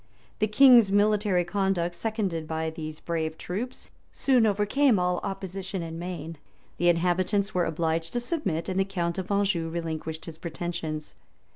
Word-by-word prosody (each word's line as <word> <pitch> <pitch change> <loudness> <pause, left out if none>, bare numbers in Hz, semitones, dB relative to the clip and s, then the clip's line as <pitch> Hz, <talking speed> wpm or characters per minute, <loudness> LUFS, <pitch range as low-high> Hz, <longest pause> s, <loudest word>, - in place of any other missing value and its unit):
The 215 - +2
king's 235 -2 +7
military 205 -3 +3
conduct, 190 -3 0
seconded 195 -6 -2
by 160 0 -2
these 155 -1 -7
brave 160 -2 -3
troops, 235 +8 -5 0.2
soon 250 -5 +3
overcame 215 +5 +3
all 180 0 +1
opposition 190 -1 -4
in 165 0 -6
Maine: 165 -3 -6 0.4
the 175 - +3
inhabitants 180 +4 +1
were 180 -1 +2
obliged 165 0 -1
to 240 - +1
submit, 240 - -2
and 190 0 -1
the - - +4
count 180 -2 -2
of 190 +2 -5
Anjou 195 -5 +1
relinquished 160 -1 -4
his 160 -1 -9
pretensions. 160 -2 -4
180 Hz, 150 wpm, -27 LUFS, 165-205 Hz, 0.4 s, king's